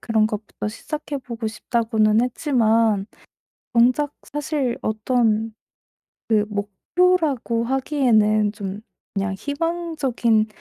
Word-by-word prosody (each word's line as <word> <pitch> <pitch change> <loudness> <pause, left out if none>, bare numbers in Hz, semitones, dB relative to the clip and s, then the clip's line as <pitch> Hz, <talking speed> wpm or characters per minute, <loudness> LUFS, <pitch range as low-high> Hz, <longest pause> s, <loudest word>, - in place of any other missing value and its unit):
그런 220 -2 +2
것부터 210 -1 -5
시작해 300 +6 -5
보고 235 -3 -6
싶다고는 220 -1 +1
했지만 230 -5 +2 0.7
정작 255 +5 +3 0.2
사실 295 -4 -1
어떤 220 0 +1 0.8
그 215 -2 +3
목표라고 235 - 0
하기에는 230 -6 +2
좀 200 -1 -6 0.3
그냥 195 -1 -1
희망적인 285 - 0
230 Hz, 220 characters per minute, -22 LUFS, 215-275 Hz, 0.8 s, 정작